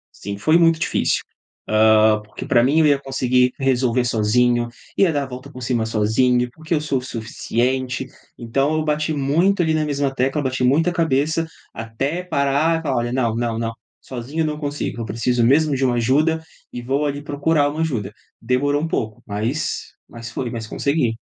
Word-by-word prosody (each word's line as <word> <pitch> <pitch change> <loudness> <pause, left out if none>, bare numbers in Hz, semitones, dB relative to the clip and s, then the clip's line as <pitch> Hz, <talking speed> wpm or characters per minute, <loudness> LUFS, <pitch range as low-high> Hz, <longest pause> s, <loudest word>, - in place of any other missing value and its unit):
Sim, 100 0 -6
foi 155 +10 +3
muito 165 -1 +4
difícil, 150 - 0 0.5
hã. 110 0 +5
Porque 105 - -9
pra 120 -1 +4
mim 150 +5 +3
eu 155 - +5
ia 140 -1 +4
conseguir 125 -2 +1
resolver 125 -2 +1
sozinho, 120 +1 +2 0.3
ia 185 -5 +4
dar 145 -1 0
a - - -7
volta 130 +1 -9
por 125 0 -9
cima 120 -3 0
sozinho, 120 +3 +2
porque 160 +5 -4
eu 150 - +1
sou 140 -3 -1
o - - -6
suficiente. 130 +2 -2 0.3
Então 135 +6 0
eu 155 - 0
bati 150 +1 0
muito 165 +7 +2
ali 160 -1 +1
na 155 -1 +1
mesma 140 -2 -1
tecla, 135 +3 0
bati 130 -1 -1
muita 155 +7 +3
a - - -4
cabeça, 160 0 +1 0.3
até 135 +10 -3
parar 145 +2 +1
e - - -11
falar: 140 -5 -1
"Olha, 120 0 -1
não, 120 -4 0
não, 115 -1 -1
não, 115 0 -2 0.3
sozinho 130 +6 -4
eu - - 0
não 150 0 -3
consigo. 145 -4 -4
Eu - - -3
preciso 120 +1 0
mesmo 145 +3 +3
de 135 - 0
uma 125 -1 +2
ajuda 155 +7 +2 0.3
e 120 - -6
vou 140 +4 0
ali 145 0 -3
procurar 145 0 +1
uma 155 +2 -5
ajuda". 115 -11 -2 0.3
Demorou 145 +5 +1
um 165 - -1
pouco, 110 -8 -3
mas 110 +8 -3 0.2
mas 115 0 -9
foi, 120 0 -4
mas 115 -2 -5
consegui. 130 -4 0
130 Hz, 195 wpm, -21 LUFS, 120-150 Hz, 0.5 s, hã